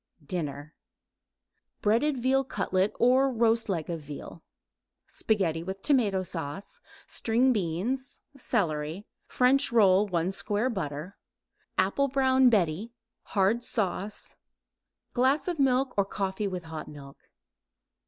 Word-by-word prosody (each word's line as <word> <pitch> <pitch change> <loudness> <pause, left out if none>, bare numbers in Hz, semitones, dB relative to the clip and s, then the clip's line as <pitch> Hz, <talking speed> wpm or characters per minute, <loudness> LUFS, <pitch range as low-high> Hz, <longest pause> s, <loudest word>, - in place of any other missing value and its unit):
DINNER 150 -2 -4 1.1
Breaded 250 +7 +2
veal 260 +2 +2
cutlet 190 -6 0
or 260 +3 +4
roast 230 -2 +2
leg 165 -5 -1
of 165 -2 -4
veal; 150 +3 -9 0.6
spaghetti 185 -7 -1
with 190 +3 -6
tomato 210 -10 +2
sauce; 175 - -6 0.3
string 245 +3 +2
beans; 210 +8 -2
celery; 175 - -2 0.2
French 265 +2 +3
roll; 205 -3 +5
1 175 -1 0
square 210 +5 -1
butter; 165 -2 -5 0.6
apple 280 0 +2
brown 260 -1 +4
Betty, 205 +1 0 0.4
hard 205 +5 +3
sauce; 205 -2 -3 0.8
glass 265 +6 +2
milk 265 -1 +2
or 200 - +2
coffee 195 +1 -2
with 180 -2 -4
hot 160 -1 -7
milk. 140 -2 -13
205 Hz, 110 wpm, -28 LUFS, 170-250 Hz, 1.1 s, roll